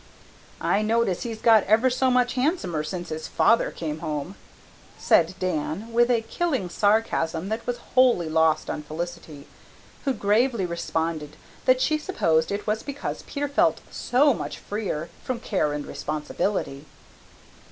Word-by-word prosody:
"I 205 Hz, -, +1 dB
notice 215 Hz, -4 st, +1 dB
he's 225 Hz, -2 st, -5 dB
got 220 Hz, -3 st, +6 dB
ever 225 Hz, +5 st, +4 dB
so 260 Hz, +1 st, +2 dB
much 250 Hz, -1 st, +2 dB
handsomer 250 Hz, -, 0 dB
since 175 Hz, +3 st, -5 dB
his 155 Hz, 0 st, -5 dB
father 230 Hz, -, +3 dB
came 155 Hz, -2 st, -5 dB
home," 155 Hz, +2 st, -4 dB, 0.6 s
said 170 Hz, +2 st, +3 dB
Dan, 185 Hz, +5 st, -3 dB
with 240 Hz, +1 st, +4 dB
a 235 Hz, -2 st, +3 dB
killing 265 Hz, -, -1 dB
sarcasm 195 Hz, -4 st, +1 dB
that 220 Hz, +1 st, -4 dB
was 245 Hz, -1 st, -1 dB, 0.2 s
wholly 245 Hz, -10 st, +4 dB
lost 160 Hz, 0 st, +2 dB
on -, -, -3 dB
Felicity, 155 Hz, -1 st, -7 dB, 0.6 s
who 275 Hz, -, +1 dB
gravely 220 Hz, 0 st, +1 dB
responded 160 Hz, -3 st, -3 dB, 0.3 s
that 255 Hz, 0 st, +4 dB
she 310 Hz, +2 st, +2 dB
supposed 165 Hz, -, +1 dB
it 200 Hz, +1 st, -3 dB
was 215 Hz, +1 st, 0 dB
because 285 Hz, 0 st, -5 dB
Peter 290 Hz, 0 st, -2 dB
felt 280 Hz, -, +2 dB
so 275 Hz, +3 st, +3 dB
much -, -, -5 dB
freer 195 Hz, -6 st, -4 dB
from 255 Hz, -2 st, -3 dB
care 185 Hz, -10 st, 0 dB
and 145 Hz, 0 st, -4 dB
responsibility. 150 Hz, -1 st, -3 dB
200 Hz, 145 wpm, -25 LUFS, 160-245 Hz, 0.6 s, got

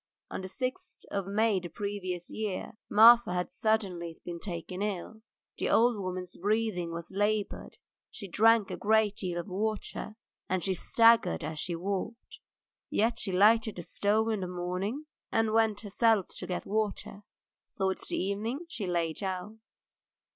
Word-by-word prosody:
On -, -, -4 dB
the 185 Hz, -, -5 dB
sixth 255 Hz, -, -4 dB
of 200 Hz, -2 st, -2 dB
May 215 Hz, +1 st, +2 dB
of -, -, -2 dB
the 175 Hz, -, -7 dB
previous 185 Hz, -3 st, -4 dB
year 210 Hz, -4 st, -3 dB, 0.2 s
Marfa 230 Hz, -2 st, +7 dB
had 180 Hz, 0 st, -2 dB
suddenly 185 Hz, -6 st, -1 dB
been 170 Hz, -1 st, -5 dB
taken 180 Hz, 0 st, -5 dB
ill. 210 Hz, +2 st, -3 dB, 0.4 s
The -, -, 0 dB
old 240 Hz, +1 st, +4 dB
woman's 185 Hz, -2 st, -4 dB
breathing 205 Hz, -3 st, 0 dB
was 170 Hz, 0 st, -6 dB
laboured, 205 Hz, +1 st, -1 dB, 0.3 s
she 200 Hz, -, -8 dB
drank 225 Hz, +2 st, +4 dB
a -, -, -4 dB
great 215 Hz, -1 st, +2 dB
deal 175 Hz, -3 st, -3 dB
of 175 Hz, -, -5 dB
water, 215 Hz, +2 st, -3 dB, 0.3 s
and 185 Hz, -1 st, 0 dB
she 190 Hz, -, +1 dB
staggered 225 Hz, -, +4 dB
as 155 Hz, 0 st, -4 dB
she 175 Hz, +2 st, -2 dB
walked, 200 Hz, +6 st, -4 dB, 0.5 s
yet 230 Hz, +2 st, +1 dB
she 195 Hz, -, -1 dB
lighted 215 Hz, +4 st, +4 dB
the 175 Hz, -, -6 dB
stove 215 Hz, +5 st, +1 dB
in 215 Hz, -2 st, 0 dB
the 185 Hz, -, -3 dB
morning 180 Hz, +10 st, -3 dB, 0.3 s
and 225 Hz, -, +3 dB
even 215 Hz, -, -2 dB
went 220 Hz, -2 st, +2 dB
herself 215 Hz, -1 st, +2 dB
to 180 Hz, -, -5 dB
get 180 Hz, -, -3 dB
water. 205 Hz, -1 st, -2 dB, 0.6 s
Towards 190 Hz, -1 st, -1 dB
evening 220 Hz, -, -2 dB
she 215 Hz, -, -4 dB
lay 170 Hz, -2 st, 0 dB
down. 190 Hz, +5 st, -5 dB
200 Hz, 160 wpm, -30 LUFS, 180-220 Hz, 0.6 s, Marfa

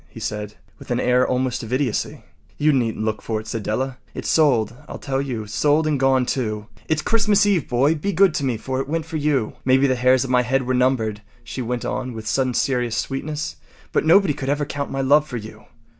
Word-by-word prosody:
” -, -, -31 dB
he -, -, -11 dB
said, 105 Hz, 0 st, -4 dB, 0.2 s
with -, -, -13 dB
an -, -, 0 dB
air 125 Hz, +1 st, +3 dB
almost 130 Hz, -1 st, -1 dB
of 115 Hz, -1 st, -8 dB
idiocy. 130 Hz, -4 st, -1 dB, 0.3 s
“You 150 Hz, +1 st, +3 dB
needn’t 115 Hz, -4 st, 0 dB
look 110 Hz, -1 st, -2 dB
for 110 Hz, -1 st, -2 dB
it,” 110 Hz, -, -10 dB
said 110 Hz, 0 st, -4 dB
Della. 130 Hz, +5 st, -2 dB, 0.2 s
“It’s -, -, -4 dB
sold, 125 Hz, -9 st, +3 dB, 0.2 s
I -, -, -6 dB
tell 135 Hz, -1 st, -2 dB
you—sold 140 Hz, +5 st, 0 dB
and 150 Hz, -3 st, +1 dB
gone, 135 Hz, -1 st, +3 dB
too. 110 Hz, -5 st, -2 dB, 0.2 s
It’s 155 Hz, -1 st, +1 dB
Christmas 210 Hz, -2 st, +3 dB
Eve, 195 Hz, -7 st, +1 dB
boy. 135 Hz, +5 st, +3 dB
Be 165 Hz, +6 st, -2 dB
good 190 Hz, -1 st, +4 dB
to 145 Hz, -, -2 dB
me, 125 Hz, -4 st, 0 dB
for 130 Hz, +4 st, -3 dB
it 135 Hz, -, -6 dB
went 165 Hz, +1 st, -1 dB
for 160 Hz, -1 st, -4 dB
you. 145 Hz, -6 st, 0 dB
Maybe 130 Hz, +1 st, +4 dB
the 130 Hz, -, +3 dB
hairs 130 Hz, 0 st, +3 dB
of 130 Hz, -, -4 dB
my 125 Hz, -1 st, +4 dB
head 130 Hz, +2 st, 0 dB
were 130 Hz, -, 0 dB
numbered,” 125 Hz, -5 st, +1 dB, 0.2 s
she 125 Hz, +2 st, -6 dB
went 125 Hz, 0 st, -3 dB
on 125 Hz, -1 st, -3 dB
with 110 Hz, -1 st, -7 dB
sudden 130 Hz, +1 st, 0 dB
serious 125 Hz, -3 st, 0 dB
sweetness, 140 Hz, -, -3 dB, 0.3 s
“but -, -, +1 dB
nobody 165 Hz, 0 st, +5 dB
could 135 Hz, -1 st, -5 dB
ever 145 Hz, +1 st, 0 dB
count 140 Hz, 0 st, -4 dB
my 135 Hz, -, -2 dB
love 145 Hz, +3 st, +4 dB
for 125 Hz, -, -5 dB
you. 110 Hz, -1 st, -10 dB
130 Hz, 230 wpm, -22 LUFS, 120-145 Hz, 0.3 s, nobody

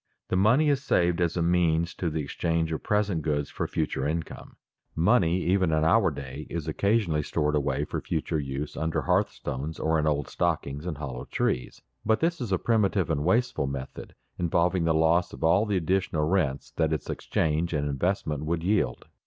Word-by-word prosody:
The -, -, 0 dB
money 120 Hz, +11 st, +4 dB
is 140 Hz, -2 st, +2 dB
saved 90 Hz, -7 st, +2 dB
as 85 Hz, 0 st, 0 dB
a 85 Hz, -, +1 dB
means 85 Hz, -1 st, +2 dB
to 90 Hz, -, -2 dB
the 80 Hz, -1 st, -2 dB
exchange 80 Hz, +2 st, -1 dB
of 80 Hz, -, -3 dB
present 105 Hz, -5 st, 0 dB
goods 75 Hz, -2 st, -1 dB
for -, -, -3 dB
future 65 Hz, -, -1 dB
income. 80 Hz, +1 st, -5 dB, 0.4 s
Money 90 Hz, -1 st, +3 dB
even 95 Hz, -2 st, +2 dB
in 80 Hz, 0 st, +2 dB
our 95 Hz, +3 st, +4 dB
day 70 Hz, 0 st, -7 dB
is 85 Hz, -2 st, -4 dB
occasionally 95 Hz, -1 st, +1 dB
stored 75 Hz, 0 st, -1 dB
away 70 Hz, -2 st, 0 dB
for -, -, -4 dB
future 80 Hz, -1 st, -2 dB
use 70 Hz, +1 st, -4 dB
under 80 Hz, +1 st, -1 dB
hearthstones 80 Hz, -5 st, -1 dB
or 80 Hz, 0 st, +1 dB
in 75 Hz, -, 0 dB
old 75 Hz, -2 st, 0 dB
stockings 70 Hz, +5 st, -2 dB
and 80 Hz, -5 st, -3 dB
hollow 65 Hz, -4 st, -6 dB
trees, 60 Hz, 0 st, -2 dB, 0.2 s
but 110 Hz, +1 st, +2 dB
this 170 Hz, -2 st, 0 dB
is 115 Hz, -5 st, -3 dB
a 95 Hz, -, +3 dB
primitive 100 Hz, -6 st, +1 dB
and 75 Hz, -2 st, 0 dB
wasteful 105 Hz, -, +1 dB
method, 65 Hz, -1 st, -7 dB, 0.2 s
involving 85 Hz, +1 st, +1 dB
the 80 Hz, -, +3 dB
loss 80 Hz, +2 st, +2 dB
of -, -, -8 dB
all 95 Hz, +7 st, +4 dB
the 100 Hz, -2 st, +1 dB
additional 90 Hz, -2 st, 0 dB
rents 80 Hz, -7 st, 0 dB
that 80 Hz, -1 st, 0 dB
its 80 Hz, -3 st, -2 dB
exchange 80 Hz, +2 st, -1 dB
and 75 Hz, -2 st, -1 dB
investment 75 Hz, 0 st, -1 dB
would 80 Hz, +1 st, -2 dB
yield. 90 Hz, -, 0 dB
80 Hz, 185 wpm, -27 LUFS, 75-95 Hz, 0.4 s, money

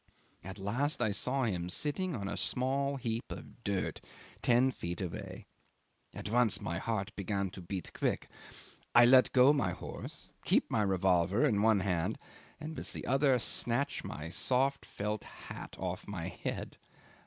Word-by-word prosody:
At 95 Hz, +2 st, -7 dB
last 120 Hz, +10 st, 0 dB
I 110 Hz, -4 st, +2 dB
saw 130 Hz, +6 st, 0 dB
him 90 Hz, -6 st, -1 dB
sitting 160 Hz, -, 0 dB
on 100 Hz, -4 st, -4 dB
a 100 Hz, -, -3 dB
small 135 Hz, +8 st, 0 dB
heap 120 Hz, -3 st, -2 dB
of 120 Hz, -, -9 dB
dirt 100 Hz, -3 st, -2 dB, 0.4 s
ten 125 Hz, +2 st, +4 dB
feet 85 Hz, -7 st, -5 dB
away. 90 Hz, -3 st, -6 dB, 0.7 s
At -, -, -6 dB
once 120 Hz, 0 st, +3 dB
my 85 Hz, +2 st, -3 dB
heart 105 Hz, -2 st, -2 dB
began 100 Hz, -1 st, -2 dB
to 95 Hz, -, -9 dB
beat 90 Hz, 0 st, -5 dB
quick. -, -, -1 dB, 0.7 s
I 120 Hz, 0 st, +9 dB
let 130 Hz, +1 st, +6 dB
go 130 Hz, +2 st, +6 dB
my 100 Hz, -12 st, +1 dB
horse, -, -, -8 dB
keep -, -, +2 dB
my 110 Hz, -, +2 dB
revolver 95 Hz, 0 st, +3 dB
in 105 Hz, -2 st, +2 dB
one 110 Hz, -2 st, +4 dB
hand, 90 Hz, -4 st, 0 dB, 0.4 s
and 160 Hz, +1 st, -6 dB
with -, -, -1 dB
the -, -, -4 dB
other 135 Hz, 0 st, +3 dB
snatch 120 Hz, +3 st, +1 dB
my 75 Hz, +2 st, -6 dB
soft 135 Hz, +9 st, +1 dB
felt 105 Hz, +1 st, -3 dB
hat -, -, -9 dB
off 90 Hz, 0 st, -4 dB
my 95 Hz, -5 st, -4 dB
head. -, -, -5 dB
110 Hz, 160 wpm, -32 LUFS, 95-130 Hz, 0.7 s, I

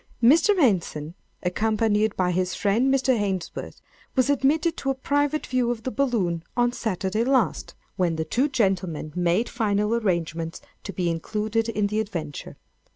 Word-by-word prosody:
Mr. 330 Hz, -, +5 dB
Henson, 170 Hz, -, +1 dB, 0.3 s
accompanied 215 Hz, +2 st, +1 dB
by 180 Hz, -1 st, +2 dB
his 180 Hz, +1 st, -1 dB
friend 225 Hz, +6 st, +2 dB
Mr. 270 Hz, 0 st, +1 dB
Ainsworth, 195 Hz, -6 st, -3 dB, 0.4 s
was 265 Hz, +1 st, +3 dB
admitted 305 Hz, +5 st, +2 dB
to 270 Hz, -, -2 dB
a 270 Hz, -, +1 dB
private 290 Hz, +3 st, 0 dB
view 255 Hz, -2 st, 0 dB
of 235 Hz, -2 st, -3 dB
the 255 Hz, -, -2 dB
balloon, 210 Hz, -12 st, 0 dB
on 240 Hz, 0 st, +3 dB
Saturday 215 Hz, -2 st, -1 dB
last—when 200 Hz, -, -1 dB
the 160 Hz, 0 st, -2 dB
two 250 Hz, -, +1 dB
gentlemen 185 Hz, -, -1 dB
made 180 Hz, +6 st, +1 dB
final 210 Hz, -2 st, 0 dB
arrangements 170 Hz, -6 st, -1 dB, 0.3 s
to 200 Hz, -, -4 dB
be 180 Hz, -1 st, -2 dB
included 215 Hz, +7 st, -1 dB
in 210 Hz, -2 st, 0 dB
the 210 Hz, +2 st, 0 dB
adventure. 170 Hz, -9 st, -5 dB
215 Hz, 150 wpm, -25 LUFS, 180-250 Hz, 0.4 s, Mr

